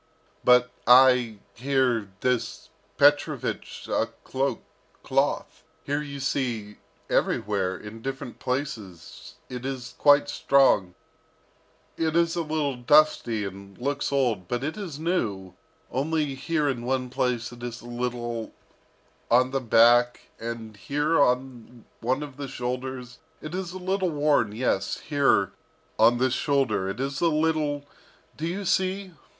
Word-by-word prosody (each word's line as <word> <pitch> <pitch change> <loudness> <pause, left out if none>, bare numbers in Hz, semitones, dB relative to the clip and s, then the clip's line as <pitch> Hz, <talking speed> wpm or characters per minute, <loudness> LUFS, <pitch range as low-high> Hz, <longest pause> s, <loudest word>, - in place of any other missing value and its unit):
"But 125 0 +5 0.2
I, 125 -3 +6 0.2
here, 125 -4 0
this 125 -2 -1 0.3
Petrovich - - +1
a - - 0 0.2
cloak, 135 +1 -2 0.4
cloth - - -1 0.2
here 145 +1 -1
you 140 -1 -7
see, 120 -6 -2 0.3
everywhere, 95 -3 0
in 105 +3 -10
different 135 -1 -6
places, 115 - -5
it 125 -1 -7
is 130 -2 -5
quite 145 0 +5
strong 105 -10 +3 1.0
it 160 -1 0
is 170 0 +2
a 170 - 0
little 150 -4 -1
dusty 120 -5 +3
and 100 0 -9
looks 140 +3 -2
old, 120 -10 0
but 120 +5 -2
it 155 +2 -2
is 190 -9 -6
new, 110 - -2 0.4
only 150 +2 0
here 150 +2 -1
in 125 -4 -2
one 130 0 -1
place 125 -2 -1
it 120 -1 -12
is 120 -1 -6
a - - -14
little 120 -1 -4 0.7
on 125 +2 +4
the 135 0 -1
back, 120 +1 +4
and 115 -2 -6
here 145 +8 +1
on 125 -3 -1
one 130 +5 -1
of 140 -3 -10
the 140 -1 -5
shoulders, 125 0 -5 0.2
it 155 +2 -8
is 185 -1 -3
a 185 - -7
little 185 0 -1
worn, 145 -7 +2
yes, 105 -4 -1
here 140 - +2 0.5
on 115 +2 +6
this 130 0 +1
shoulder 130 -10 +1
it 100 +5 -5
is 135 +1 -3
a 170 - +4
little 155 -2 0 0.5
do 160 - -3
you 195 +4 -4
see? 190 +1 0
130 Hz, 135 wpm, -26 LUFS, 120-145 Hz, 1.0 s, I